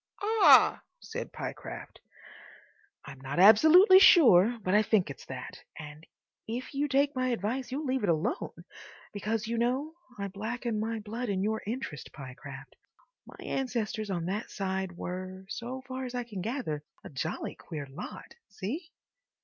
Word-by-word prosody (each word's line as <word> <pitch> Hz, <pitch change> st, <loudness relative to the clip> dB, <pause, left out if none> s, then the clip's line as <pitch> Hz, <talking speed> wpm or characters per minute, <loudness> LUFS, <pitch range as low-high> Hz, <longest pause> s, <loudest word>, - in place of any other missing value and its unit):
("Ah!" 440 Hz, +1 st, +6 dB, 0.2 s
said -, -, -6 dB
Pyecraft.) -, -, -7 dB, 1.1 s
I'm 135 Hz, -1 st, -11 dB
not 135 Hz, +3 st, -5 dB
absolutely 315 Hz, -, +8 dB
sure, 240 Hz, -, +7 dB
but 185 Hz, -, 0 dB
I 210 Hz, -, +6 dB
think 205 Hz, -7 st, +1 dB
it's 135 Hz, -, -12 dB
that. -, -, -7 dB, 0.2 s
And 150 Hz, +1 st, -10 dB, 0.4 s
if 240 Hz, +5 st, -5 dB
you 285 Hz, +2 st, 0 dB
take 280 Hz, +1 st, +2 dB
my 255 Hz, 0 st, 0 dB
advice 245 Hz, +2 st, -2 dB
you'll 290 Hz, +4 st, -3 dB
leave 260 Hz, -1 st, 0 dB
it 205 Hz, -, 0 dB
alone. 165 Hz, -, -2 dB, 0.5 s
Because, 215 Hz, +2 st, -2 dB
you 230 Hz, +1 st, -2 dB
know—I 255 Hz, -2 st, -3 dB
blacken 220 Hz, +3 st, -3 dB
my 225 Hz, +1 st, -2 dB
blood 225 Hz, +3 st, -5 dB
in 190 Hz, -1 st, 0 dB
your 220 Hz, +1 st, -1 dB
interest, 220 Hz, -, -5 dB
Pyecraft—my 135 Hz, -, -13 dB
ancestors 230 Hz, -5 st, -2 dB
on 175 Hz, -3 st, -2 dB
that 200 Hz, +5 st, -3 dB
side 190 Hz, -2 st, -3 dB
were, 185 Hz, +1 st, -6 dB
so 255 Hz, +2 st, -5 dB
far 260 Hz, 0 st, -5 dB
as 250 Hz, 0 st, -6 dB
I 245 Hz, -, -1 dB
can 210 Hz, -6 st, -7 dB
gather, 205 Hz, -, -3 dB, 0.2 s
a -, -, -9 dB
jolly 145 Hz, +3 st, -4 dB
queer 150 Hz, -4 st, -7 dB
lot. 135 Hz, 0 st, -9 dB, 0.2 s
See?" 265 Hz, -, -5 dB
220 Hz, 150 wpm, -29 LUFS, 185-255 Hz, 1.1 s, absolutely